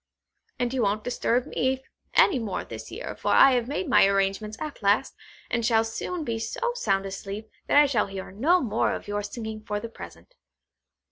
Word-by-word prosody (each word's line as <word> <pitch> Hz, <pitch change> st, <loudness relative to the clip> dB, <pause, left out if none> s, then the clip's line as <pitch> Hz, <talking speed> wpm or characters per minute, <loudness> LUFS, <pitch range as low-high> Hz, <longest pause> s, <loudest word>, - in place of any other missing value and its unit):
And 245 Hz, 0 st, -1 dB
you 260 Hz, -, 0 dB
won't 210 Hz, 0 st, 0 dB
disturb 245 Hz, 0 st, 0 dB
me 265 Hz, -1 st, -1 dB, 0.3 s
any 280 Hz, -, +5 dB
more 215 Hz, -5 st, -3 dB
this -, -, -9 dB
year, -, -, -6 dB
for -, -, -7 dB
I 270 Hz, -, +8 dB
have 245 Hz, -2 st, +1 dB
made 295 Hz, +6 st, -2 dB
my 260 Hz, -7 st, +6 dB
arrangements 195 Hz, +2 st, 0 dB
at 305 Hz, -5 st, -6 dB
last, 205 Hz, +6 st, +2 dB, 0.3 s
and 235 Hz, -1 st, -1 dB
shall 225 Hz, -1 st, +3 dB
soon 320 Hz, +9 st, -4 dB
be 230 Hz, -5 st, -2 dB
so 475 Hz, -, -2 dB
sound 195 Hz, -, 0 dB
asleep, 200 Hz, +2 st, -6 dB, 0.2 s
that -, -, +3 dB
I 295 Hz, -, +8 dB
shall 245 Hz, -8 st, +1 dB
hear 195 Hz, -1 st, -7 dB
no 305 Hz, -, +3 dB
more 225 Hz, -3 st, 0 dB
of -, -, -8 dB
your 205 Hz, 0 st, -2 dB
singing 220 Hz, +1 st, -6 dB
for 210 Hz, -1 st, -3 dB
the 230 Hz, -, -7 dB
present. 365 Hz, -, -12 dB
225 Hz, 195 wpm, -26 LUFS, 205-265 Hz, 0.3 s, I